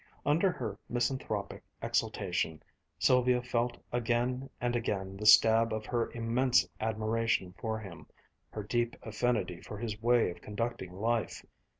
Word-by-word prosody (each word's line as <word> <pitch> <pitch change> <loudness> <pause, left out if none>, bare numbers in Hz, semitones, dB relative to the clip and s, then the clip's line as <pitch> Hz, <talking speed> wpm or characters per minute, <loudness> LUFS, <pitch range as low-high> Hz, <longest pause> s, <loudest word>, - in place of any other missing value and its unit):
Under 165 +6 +3
her 110 - -5
misanthropic 120 -4 -2 0.2
exultation, 80 -1 -1 0.3
Sylvia 125 -1 +4
felt 120 0 -1
again 120 +2 0
and 120 0 0
again 95 -5 -2
the 105 +2 -2
stab 110 +1 +7
of 110 0 -3
her 120 +1 -1
immense 120 +2 +2
admiration 110 -3 0
for 110 -1 -2
him, 95 -6 -10 0.4
her 105 - -5
deep 120 +2 0
affinity 110 -5 -1
for 105 - -8
his 110 -1 -4
way 120 -4 +3
of - - -12
conducting 105 -3 -4
life. 110 +4 -1
115 Hz, 130 wpm, -31 LUFS, 105-120 Hz, 0.4 s, stab